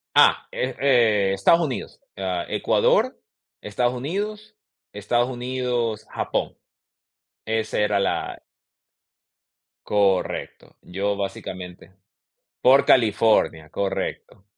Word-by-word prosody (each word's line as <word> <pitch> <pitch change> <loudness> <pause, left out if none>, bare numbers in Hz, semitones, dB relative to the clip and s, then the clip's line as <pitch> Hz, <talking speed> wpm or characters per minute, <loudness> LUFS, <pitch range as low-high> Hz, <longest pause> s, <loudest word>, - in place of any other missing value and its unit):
Ah, - - +5
eh - - -3
eh, 110 -8 +3
Estados 100 - +4
Unidos, 145 -7 -4 0.2
ah, 90 -2 -2
Ecuador, - - +1 0.4
Estados 120 +4 -1
Unidos, 210 - -5 0.4
Estados 120 +4 0
Unidos, 125 -3 -2
Japón. - - -3 0.9
Esa 110 0 -2
era 105 -1 +2
la 100 - -2 1.4
Correcto, 100 -2 -1
yo 100 +3 -2
básicamente. 95 -2 -7 0.7
Por 135 +2 +6
California, 105 -8 +3
correcto. 95 0 -4
110 Hz, 85 wpm, -23 LUFS, 95-125 Hz, 1.4 s, Por